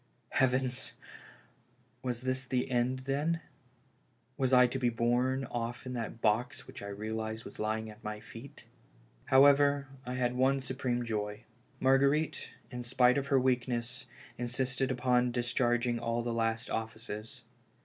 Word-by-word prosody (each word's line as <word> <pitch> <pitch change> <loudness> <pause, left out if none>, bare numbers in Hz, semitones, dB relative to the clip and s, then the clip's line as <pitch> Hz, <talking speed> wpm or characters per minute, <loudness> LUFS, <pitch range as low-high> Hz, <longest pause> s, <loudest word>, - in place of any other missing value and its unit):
Heavens! 130 -1 +1 1.1
was 125 -2 -3
this 130 0 -2
the 125 0 -1
end, 125 +1 +1
then? 150 +5 0 1.0
Was 135 -2 0
I 125 -1 +7
to 125 +2 -2
be 125 -2 +2
borne 125 +3 +1
oft* 120 0 -4
in 130 - -4
that 115 -1 -5
box 120 +6 +1
which - - -10
I 100 - -6
realized 110 +2 -4
was - - -10
lying 110 +1 -1
at 105 0 -12
my 105 0 -4
feet? 115 +5 -11 0.6
However, 140 +1 +5
I 125 0 -4
had 125 -1 +1
one 135 +2 +3
supreme 130 -2 -2
joy. 105 -1 -3 0.4
Marguerite, 140 +3 +2 0.2
in 125 -1 -5
spite 125 +1 +4
of 140 - -5
her 135 -1 +4
weakness, 125 -1 -1 0.3
insisted 125 +2 -1
upon 125 -1 +2
discharging 120 0 +1
all 115 +1 -1
the 120 0 -2
last 115 +1 -1
offices. 115 +2 -5
125 Hz, 140 wpm, -32 LUFS, 115-130 Hz, 1.1 s, I